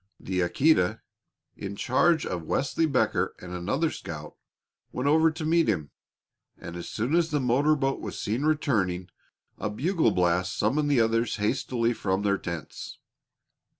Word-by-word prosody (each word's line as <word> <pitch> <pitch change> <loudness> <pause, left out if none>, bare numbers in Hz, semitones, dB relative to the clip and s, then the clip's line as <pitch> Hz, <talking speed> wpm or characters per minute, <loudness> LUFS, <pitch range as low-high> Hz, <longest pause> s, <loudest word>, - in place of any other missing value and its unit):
The 95 -1 -3
Aquita, 90 - +2 0.6
in 100 0 -6
charge 160 +9 +2
of 90 -2 -3
Wesley 150 +4 +1
Becker 135 -4 +1
and 90 0 -9
another 115 - 0
scout, 75 -2 -7 0.6
went 125 +2 -2
over 160 +2 +5
to 160 0 -5
meet 165 -2 +3
him, 80 -8 -1 0.7
and 85 - -8
as 85 - -6
soon 120 +7 -2
as 170 -1 +3
the 150 - 0
motor 135 +4 +3
boat 135 -2 -1
was - - -6
seen 110 +5 -1
returning, 105 - 0 0.5
a - - -2
bugle 155 - +1
blast 90 0 +1
summoned 145 +8 +1
the 140 -4 +3
others 115 +1 +1
hastily 115 +2 0
from 95 -2 -1
their 100 -1 +1
tents. 85 -3 -7
115 Hz, 150 wpm, -27 LUFS, 95-150 Hz, 0.7 s, over